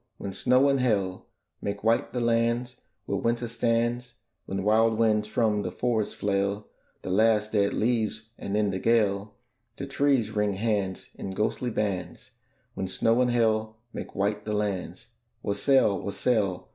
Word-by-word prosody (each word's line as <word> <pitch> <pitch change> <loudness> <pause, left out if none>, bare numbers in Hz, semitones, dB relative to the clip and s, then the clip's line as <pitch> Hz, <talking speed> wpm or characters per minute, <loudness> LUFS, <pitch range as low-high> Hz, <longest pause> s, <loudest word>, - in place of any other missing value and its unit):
when 100 - -6
snow 125 +6 +3
and 135 -1 +2
hail 100 -7 0 0.3
Make 100 0 -4
white 115 +1 +2
the 125 0 -2
lands 120 +1 +1 0.3
where - - -1
Winter 120 +1 0
stands; 120 +1 -1 0.3
When 95 0 -3
wild 110 +2 +3
winds 110 -2 +2
from 110 -1 +1
the - - -3
forests 115 -4 -1
flail 100 +1 -1 0.3
The 95 - -4
last 105 +1 +3
dead 100 -2 +2
leaves, 110 -1 -1
and, 100 -2 -3
in 105 -2 +2
the 95 - -3
gale, 105 -2 +1 0.4
The 140 - -4
trees 135 -4 +1
wring 105 -1 0
hands 100 -3 -2
in 95 - -6
ghostly 120 +4 -1
bands: 95 -6 -3 0.4
When 95 - -3
snow 115 +6 +2
and 125 - +3
hail 110 -2 +1 0.2
make - - -7
white 105 +1 0
the 105 - -3
lands, 100 -3 -3 0.3
Wassail! 105 0 +2
wassail! 100 -3 -1
110 Hz, 155 wpm, -27 LUFS, 100-115 Hz, 0.4 s, snow